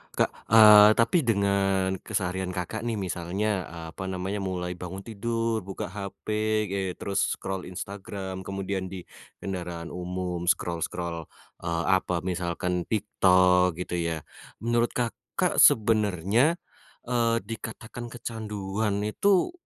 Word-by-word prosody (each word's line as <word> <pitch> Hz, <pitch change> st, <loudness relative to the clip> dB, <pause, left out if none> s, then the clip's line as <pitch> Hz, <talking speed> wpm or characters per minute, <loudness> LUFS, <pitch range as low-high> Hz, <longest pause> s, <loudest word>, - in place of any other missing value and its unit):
Kak, -, -, +2 dB, 0.2 s
eee, 105 Hz, -1 st, +9 dB
tapi 115 Hz, +10 st, +3 dB
dengan 95 Hz, -2 st, +2 dB
keseharian 95 Hz, -2 st, -2 dB
Kakak 110 Hz, +6 st, -3 dB
nih 115 Hz, -, -1 dB
misalnya, 95 Hz, +1 st, -2 dB
eee, 80 Hz, 0 st, -8 dB
apa 95 Hz, +2 st, -6 dB
namanya 95 Hz, +2 st, -3 dB
mulai 90 Hz, -2 st, -3 dB
bangun 95 Hz, +2 st, -6 dB
tidur, 115 Hz, +1 st, -1 dB
buka 95 Hz, -2 st, -6 dB
hape, 105 Hz, +1 st, -2 dB
eee, 95 Hz, -2 st, -2 dB
terus 100 Hz, 0 st, 0 dB
scroll 95 Hz, -2 st, -5 dB
Instagram, 95 Hz, 0 st, -6 dB
kemudian 95 Hz, -1 st, -3 dB
di 90 Hz, -2 st, -7 dB, 0.4 s
kendaraan 85 Hz, -3 st, -5 dB
umum 90 Hz, -1 st, -4 dB
scroll-scroll, 85 Hz, -2 st, -1 dB, 0.3 s
eee, 85 Hz, 0 st, -2 dB, 0.2 s
apa 90 Hz, -1 st, -3 dB
misalkan 90 Hz, -1 st, -2 dB
TikTok 90 Hz, -4 st, +3 dB
gitu 90 Hz, 0 st, -3 dB
ya, 80 Hz, -3 st, -2 dB, 0.4 s
menurut 120 Hz, 0 st, +1 dB
Kakak 120 Hz, -2 st, -1 dB
sebenarnya, 110 Hz, -, +4 dB, 0.5 s
eee, 115 Hz, -1 st, +1 dB
dikatakan 115 Hz, +2 st, -7 dB
kecanduan 105 Hz, -3 st, -3 dB
itu 190 Hz, -, +2 dB
95 Hz, 115 wpm, -27 LUFS, 90-110 Hz, 0.5 s, eee